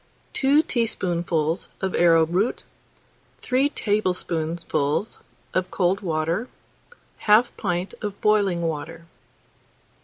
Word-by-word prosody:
Two 285 +3 +4
teaspoonfuls 175 - -1
of 190 -1 -2
arrowroot, 170 +5 +3 0.7
3 265 +3 +1
tablespoonfuls 175 - -1 0.3
of 185 0 0
cold 185 +1 +1
water, 165 +5 -1 0.8
1/2 215 +3 +6
pint 180 +2 -2
of 205 -2 -5
boiling 200 -5 +2
water. 165 +1 -4
180 Hz, 85 wpm, -24 LUFS, 165-210 Hz, 0.8 s, 1/2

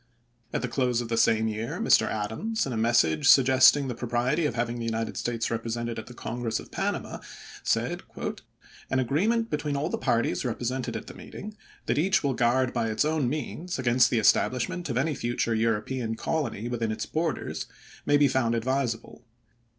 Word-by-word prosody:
At - - -2
the - - 0
close 125 -1 0
of 120 -2 -4
the 115 - 0
same 110 -1 +3
year 110 +1 -3
Mr. - - +4
Adams, 110 - -2
in 135 - -3
a - - -3
message 110 -9 +2
suggesting 130 +1 +6
the 125 - -2
propriety 120 +6 0
of 120 - -4
having 120 0 -2
the 115 - -3
United 115 0 -2
States 115 -1 -2
represented 115 0 -3
at 110 - -9
the 125 - -11
Congress 115 -2 -3
of - - -12
Panama, - - -3 0.4
said: - - 0 0.9
"An 130 - +1
agreement 205 - +1
between 150 -1 -1
all 150 +4 -1
the - - -3
parties 120 -3 +1
represented 125 +1 -2
at - - -8
the - - -10
meeting, 210 +1 -9 0.3
that - - +1
each 190 +3 +2
will 140 -2 +1
guard 125 +1 +2
by 115 - 0
its 110 +6 +1
own 155 -5 +1
means 155 +5 -4
against 125 -1 +3
the 120 - +1
establishment 125 - +2
of 120 - -1
any 150 +4 +1
future 120 -2 -1
European 115 +1 -1
colony 135 -5 -2
within 115 -2 -1
its 110 - -3
borders, 160 0 -2 0.4
may 145 - +4
be 145 0 +5
found 120 -3 +1
advisable. 120 -1 -2
120 Hz, 180 wpm, -27 LUFS, 115-140 Hz, 0.9 s, suggesting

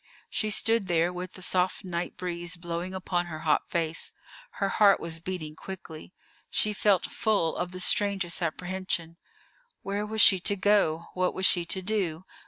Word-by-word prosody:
She 215 - 0
stood 225 -1 +2
there, 175 0 +1
with 180 0 -6
the 185 - -7
soft 185 +2 +1
night 175 -1 -4
breeze 175 -1 -4
blowing 175 +2 -4
upon 175 -1 -1
her 155 -2 -7
hot 155 -2 +1
face; 165 -1 -2 0.4
her 195 - -1
heart 200 0 +5
was 165 -1 -3
beating 165 -3 -5
quickly: 175 -3 -9 0.4
she 210 - +1
felt 200 -2 +2
full 200 -7 +1
of 180 0 -3
the 185 - -7
strangest 195 -2 +2
apprehension. 175 0 -3 0.7
Where 200 +2 -2
was 220 0 +1
she 190 - +8
to 200 +3 +3
go? 185 -5 +2
What 185 0 0
was 190 - 0
she 175 -2 +4
to 190 +2 -2
do? 185 -4 -2
180 Hz, 170 wpm, -27 LUFS, 170-195 Hz, 0.7 s, she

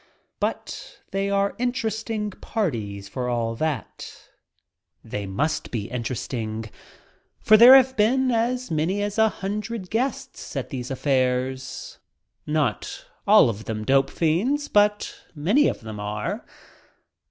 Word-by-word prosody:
But - - -4
they 195 0 -1
are 200 0 +1
interesting 220 -3 -2
parties 110 - -3
for 125 +4 -3
all 115 -1 -1
that. 150 -8 -4 0.7
They 100 -1 -5
must 150 +11 -1
be 110 -3 -4
interesting, 115 -2 -4 0.7
for 215 - +6
there 240 +4 +10
have 260 0 +5
been 255 +4 +3
as 245 0 0
many 170 +6 0
as 205 +1 -2
a 220 0 +5
hundred 205 -1 -5
guests 255 +5 -3
at - - -3
these 125 -3 -4
"affairs," 130 -1 -1 0.5
not 150 -8 -1 0.2
all - - +7
of 110 -1 -4
them 110 -1 -4
dope 135 +1 +3
fiends, 230 - 0
but 210 0 +2 0.2
many 200 - +3
of - - -2
them 110 -2 -7
are. 105 +1 -4
155 Hz, 125 wpm, -24 LUFS, -, 0.7 s, there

